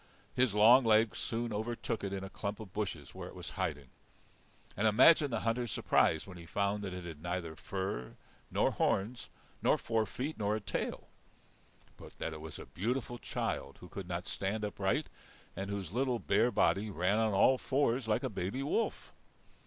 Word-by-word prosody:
His 125 -5 +2
long 115 +5 +8
legs 110 -1 +4
soon 115 0 -2
overtook 115 +1 -3
it 100 - -2
in 95 -1 -3
a 95 - -6
clump 100 0 -4
of 105 -5 -9
bushes 95 -9 -4
where - - -7
it - - -11
was - - -7
hiding, 70 -3 -3 0.8
and 105 +3 +2
imagine 145 +7 +6
the 115 -3 -1
hunter's 115 0 0
surprise 80 -3 +2
when 90 -3 -10
he 85 - -11
found 100 +3 0
that 95 - -3
it 90 0 -6
had 80 -3 -8
neither 85 -1 -3
fur 95 -7 -4 0.3
nor - - +2
horns 110 +5 0 0.3
nor - - +4
four 110 -1 0
feet 135 +10 -4
nor 105 0 +1
a - - -1
tail, 100 - -3 0.9
but - - -13
that 80 - -3
it 75 - -8
was 80 -1 -7
a - - -8
beautiful 120 +4 -2
child - - -3
who 90 - -11
could 95 -3 -6
not 90 0 -3
stand 105 +2 -2
upright, 105 +8 0 0.5
and 95 +1 -4
whose 100 -4 -4
little, 125 +2 +1
bare 110 +2 +3
body 105 -1 +2
ran 95 +3 +1
on 110 -1 +2
all 130 +6 +5
fours 130 -3 +1
like 105 - +1
a - - +1
baby 100 +7 -2
wolf! 190 +11 -1
105 Hz, 185 wpm, -33 LUFS, 95-115 Hz, 0.9 s, long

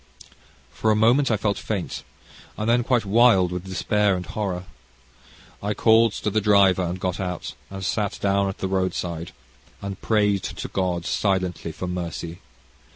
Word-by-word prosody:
"For 110 - 0
a 110 - +4
moment 120 +6 +4
I 110 - +2
felt 100 0 -1
faint, 100 -5 -3 0.6
and 105 +2 -2
then 120 +1 +3
quite 120 -2 +1
wild 100 -4 +5
with 90 +1 -4
despair 100 +1 +1
and 90 0 -4
horror. 95 -4 -3 1.0
I 105 +1 -2
called 110 +1 +4
to 105 - -2
the 110 +2 +1
driver, 100 -3 +5
and 90 +1 -2
got 90 0 -2
out, 90 -2 -4 0.2
and 95 -1 -6
sat 105 +1 -1
down 100 0 +1
at 95 - -6
the 95 - -2
road 95 -1 0
side, 85 -1 -4 0.5
and 100 -1 -6
prayed 105 -3 +2
to - - -5
God 90 -3 -1
silently 95 -4 -1
for 85 - -6
mercy. 85 -1 -5
100 Hz, 165 wpm, -24 LUFS, 90-105 Hz, 1.0 s, wild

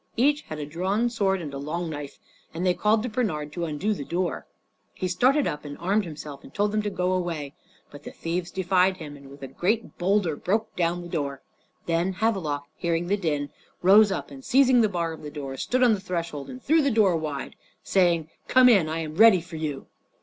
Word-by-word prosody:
Each 290 +5 +3
had 155 - -8
a 150 - -4
drawn 190 +10 -1
sword 195 -5 0
and 145 -3 -6
a 140 - -5
long 165 +5 -3
knife, 145 -3 -6 0.4
and 175 +3 -2
they 180 - +4
called 215 +3 +2
to 250 - -2
Bernard 165 -11 -2
to 170 -1 -2
undo 165 +7 -1
the 165 - -5
door. 175 +4 -2 0.5
He 185 - -2
started 255 +11 +3
up 150 - -3
and 145 -1 -8
armed 195 +4 +1
himself, 150 -3 -8
and - - -13
told 205 +5 0
them 215 0 +1
to 210 - -2
go 180 -2 -1
away. 165 -6 -3 0.4
But 145 - -11
the - - -8
thieves 170 +1 -3
defied 185 0 +2
him, 150 -4 -8
and 140 -1 -14
with 140 0 -13
a - - -4
great 210 - -2
boulder 185 -3 +1
broke 215 +8 -1
down 175 0 0
the - - -8
door. 140 -5 -3 0.4
Then 170 +3 0
Havelok, 185 -9 -1
hearing 170 0 -1
the 200 - +3
din, 150 -6 -2 0.3
rose 205 +3 +7
up, 145 -6 -4
and 135 -1 -11
seizing 260 -2 +5
the 215 - +3
bar 170 -3 -2
of 160 - -10
the 150 - -7
door 140 -3 -6
stood 255 - 0
on 240 -3 +6
the 205 - -1
threshold 170 -6 -4
and 255 - -8
threw 320 +2 +4
the 280 - +2
door 215 -7 +3
wide 155 -3 -3
open, - - -23 0.3
saying, 170 -4 +2 0.2
"Come 255 -1 +6
in, 190 -9 +4
I 160 +1 -2
am 155 0 -6
ready 220 -3 +8
for 170 -1 -9
you!" 150 -3 -4
175 Hz, 225 wpm, -25 LUFS, 150-205 Hz, 0.5 s, ready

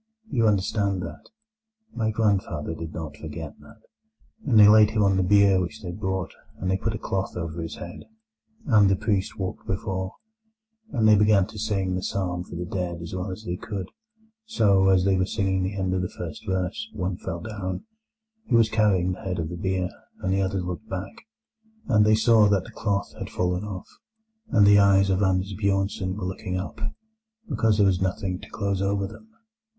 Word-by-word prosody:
You 115 -4 +3
understand 100 -2 +1
that? - - -9 0.6
My 110 -2 0
grandfather 100 -8 0
did 80 0 -6
not 80 -2 -6
forget 80 0 -7
that. 110 0 -17 0.6
And 115 -6 +4
they 105 - +10
laid 105 0 +7
him 110 -1 +1
on 100 -1 +3
the 95 - +2
bier 100 0 +5
which 90 +2 -5
they 90 - -4
brought, 95 -2 -3 0.3
and 95 +1 -2
they 95 - +2
put 110 +3 -2
a - - -3
cloth 95 -2 -3
over 85 -1 -4
his 80 - -5
head, 85 0 -9 0.6
and 105 - +5
the 95 - +3
priest 100 0 -1
walked 95 -2 -5
before; 95 -1 -3 0.8
and 110 -3 +2
they 110 - +7
began 105 -2 +4
to 105 +1 -10
sing 100 -3 -1
the 90 - -2
psalm 90 -2 -2
for 90 - -10
the 90 +1 -3
dead 90 -1 -3
as 85 +1 -7
well 90 +2 -3
as 95 +4 -7
they 90 -4 -3
could. 100 -2 -5 0.6
So, 100 - +3
as 95 -1 +4
they 95 -1 +3
were 95 - +2
singing 95 -1 0
the 95 +2 -2
end 95 -1 0
of 95 - 0
the 90 - -2
first 85 +4 -8
verse, 95 +3 -2
one 90 -3 -2
fell 85 -2 -5
down, 105 - -5 0.6
who 125 - +3
was 115 -1 +5
carrying 100 -5 +2
the 90 - -6
head 95 -1 -3
of 80 -2 -2
the 90 - -5
bier, 95 0 -1 0.3
and 95 0 +1
the 95 - +2
others 95 -1 -1
looked 90 +5 -6
back, 95 +1 -4 0.7
and 105 -4 +4
they 110 - +6
saw 110 -1 +5
that 100 -3 +2
the - - -12
cloth 100 -2 -2
had - - -5
fallen 90 +1 -1
off, 95 -3 -6 0.6
and 110 -7 +5
the 100 0 +7
eyes 100 -1 +5
of 95 +1 +1
Anders 95 0 +1
Bjornsen 95 -1 0
were 100 -2 -4
looking 95 0 -3
up, 95 - -6 0.7
because 115 -6 +2
there 105 - +5
was 95 -2 +2
nothing 95 -1 -1
to - - -12
close 100 -2 -2
over 100 0 0
them. 220 - -11
95 Hz, 200 wpm, -25 LUFS, 90-105 Hz, 0.8 s, they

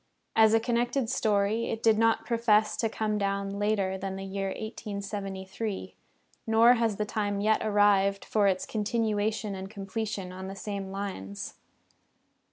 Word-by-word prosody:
As 220 0 +6
a - - +5
connected 240 +1 0
story 215 -1 +1
it 225 - -4
did 220 -1 +4
not 225 0 +3
profess 220 -3 +3
to 225 - 0
come 215 -1 -1
down 200 0 -1
later 200 -2 0
than 190 0 -4
the 195 0 -6
year 195 0 -3
1873, 200 -1 -5 0.5
nor 225 +2 +6
has 230 -3 +1
the 210 - -1
time 205 -1 -1
yet 215 +2 +2
arrived 205 -2 +3
for 210 -2 +2
its 185 -1 +1
continuation 215 -1 -1
and 190 0 -6
completion 200 -1 -4
on 190 +1 -7
the 195 - -6
same 200 -1 -5
lines. 190 - -5
205 Hz, 150 wpm, -28 LUFS, 195-220 Hz, 0.5 s, As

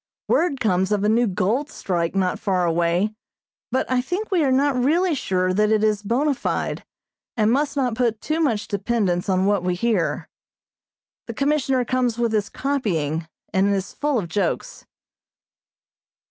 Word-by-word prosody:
Word 310 -6 +1
comes 190 -4 +1
of 205 -1 +1
a 210 - +3
new 235 +2 +3
gold 215 - 0
strike 175 - -2
not 185 -2 0
far 185 -3 0
away, 170 +5 +1 0.6
but 260 - +1
I 255 -1 +1
think 360 +12 -4
we 355 -4 +3
are 270 - +2
not 280 +2 +3
really 320 +8 +2
sure 185 -8 0
that 210 +2 +2
it 215 -1 +2
is 210 -1 +2
bona 255 +8 +1
fide, - - -3 0.5
and 215 0 +3
must 285 +2 0
not 255 -4 +1
put 230 -2 0
too 310 +6 -2
much 235 -10 0
dependence 200 -3 -1
on 185 0 +2
what 200 -1 +2
we 180 0 -1
hear. 210 -3 0 1.0
The 230 - -6
Commissioner 275 -2 +1
comes 250 -2 0
with 235 -1 0
his 210 -2 0
copying, 170 - -1 0.3
and 190 +1 +3
is 190 -1 -4
full 290 -2 0
of 195 -6 -2
jokes. 180 +1 -3
220 Hz, 165 wpm, -22 LUFS, 190-265 Hz, 1.0 s, a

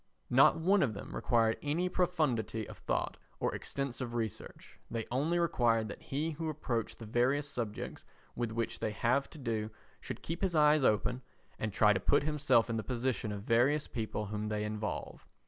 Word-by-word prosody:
Not 135 +4 +6
one 190 +4 +4
of 115 - +1
them 100 - -7
required 115 -2 +2
any 160 +5 0
profundity 150 - 0
of - - -10
thought - - -1 0.2
or - - 0
extensive 125 -3 -3
research; 110 -4 -5
they 115 -1 -3
only 150 +7 +1
required 120 -10 +2
that - - -8
he 150 +4 -2
who 160 +1 -3
approached 125 -7 -2
the 115 - -9
various 130 +6 +1
subjects 115 -6 -4 0.3
with 120 -2 -2
which 115 +1 -2
they - - -1
have 120 +6 +1
to - - -11
do 110 -5 -2 0.3
should - - -7
keep 165 +2 -4
his 190 -3 0
eyes 150 -1 +5
open 120 +3 +2 0.4
and 110 - -1
try 105 +2 +5
to 95 - 0
put - - +3
himself 145 -6 +3
in 115 -1 -1
the 110 - -2
position 125 -3 -1
of 105 -1 -4
the - - +1
various 135 +6 +3
people 110 -2 -3
whom 105 +1 -3
they 105 0 -1
involve. 105 0 -4
120 Hz, 185 wpm, -33 LUFS, 110-150 Hz, 0.4 s, Not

